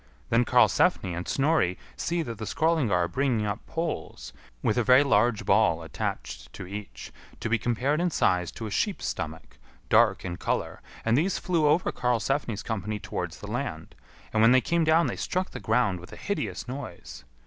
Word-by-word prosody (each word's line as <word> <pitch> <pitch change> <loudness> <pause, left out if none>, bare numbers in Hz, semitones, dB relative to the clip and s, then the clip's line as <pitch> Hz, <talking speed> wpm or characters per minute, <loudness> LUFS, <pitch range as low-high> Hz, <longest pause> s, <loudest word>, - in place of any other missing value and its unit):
Then 120 +1 +4
Karlsefni 95 -4 +3
and 85 +2 -5
Snorri 135 - +2 0.2
see 170 0 -1
that 115 -6 -7
the 110 - -4
Skrœlingar 160 -2 +1
are 90 -2 +2
bringing 125 -2 0
up 100 +1 -3
poles, 165 - -4 0.3
with 110 - +2
a 120 - +2
very 130 +4 +6
large 120 -4 +2
ball - - +3
attached - - -5
to - - -7
each, 95 -10 -8 0.3
to - - -3
be 115 +1 +2
compared 125 +8 0
in 180 - +2
size 90 - +1
to 115 - -6
a 105 - -5
sheep's 205 - -1
stomach, 80 -2 -5 0.3
dark - - +4
in 85 -1 -4
colour; - - -2 0.2
and 115 +1 +3
these 170 +8 +1
flew 165 -4 +1
over 160 +4 +2
Karlsefni's 125 -2 -1
company 105 -1 -3
towards - - -5
the - - -7
land, - - -4 0.4
and 110 - +3
when 115 +2 +7
they 130 - +7
came 170 +5 +1
down 160 +2 +4
they - - -2
struck 185 +1 -2
the - - -6
ground 110 -5 +1
with 90 - -12
a - - -8
hideous 200 -8 -3
noise. 90 - -8
120 Hz, 185 wpm, -27 LUFS, 100-150 Hz, 0.4 s, when